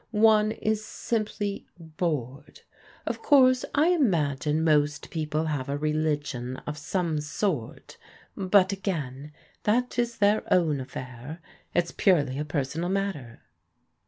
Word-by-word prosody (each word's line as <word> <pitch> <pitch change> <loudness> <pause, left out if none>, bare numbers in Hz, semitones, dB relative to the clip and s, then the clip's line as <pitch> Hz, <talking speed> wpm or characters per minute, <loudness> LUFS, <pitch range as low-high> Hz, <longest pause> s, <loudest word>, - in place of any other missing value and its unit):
One 215 -1 +4
is 215 0 -1
simply 215 -2 -3
bored. 155 -6 -4 0.4
Of - - -3
course, 255 -3 +5
I 305 +4 +4
imagine 155 - +1
most 150 -2 +1
people 155 -1 -1
have 145 -4 -2
a 140 - -1
re 150 +1 -1
ligion 145 -5 -2
of 150 - -4
some 160 +1 -1
sort; 150 - -3 0.4
but 190 0 +3
again, 150 -8 -4 0.3
that 245 +3 +1
is 235 -1 -1
their 205 +1 +3
own 160 -6 +3
affair. 130 +4 -8 0.4
It's 175 -1 +1
purely 145 -8 +2
a 150 - -2
personal 150 +3 -2
matter." 190 -12 -3
160 Hz, 125 wpm, -27 LUFS, 145-205 Hz, 0.4 s, course